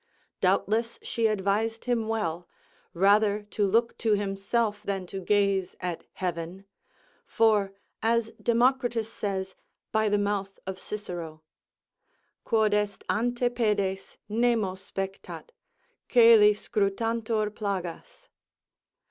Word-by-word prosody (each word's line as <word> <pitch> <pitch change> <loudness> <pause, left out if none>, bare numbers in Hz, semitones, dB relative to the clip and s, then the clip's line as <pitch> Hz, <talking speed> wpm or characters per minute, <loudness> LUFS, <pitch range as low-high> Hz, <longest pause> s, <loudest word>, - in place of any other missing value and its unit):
Doubtless 230 +3 +1
she 230 -1 0
advised 215 +2 -1
him 235 -3 0
well, 175 -6 -2 0.4
rather 205 +3 +3
to 205 -2 +1
look 230 +4 +2
to 225 -2 +2
himself 205 +2 -1
than 195 -2 -3
to 190 +2 -6
gaze 195 -1 +1
at 180 -2 -4
heaven; 180 +1 -4 0.6
for, 210 -3 +3 0.3
as 225 0 +1
Democritus 240 -1 +1
says, 190 -2 -3 0.4
by 220 -1 +2
the 205 - +2
mouth 200 -1 -2
of 190 0 -5
Cicero, 175 -7 -6 1.0
Quod 220 -2 +2
est 210 0 -1
ante 245 +2 0
pedes, 210 -5 -1
nemo 225 -3 +1
spectat: 195 - -7 0.6
coeli 225 -4 +7
scrutantur 220 +1 -1
plagas. 200 - -5
210 Hz, 105 wpm, -27 LUFS, 195-225 Hz, 1.0 s, coeli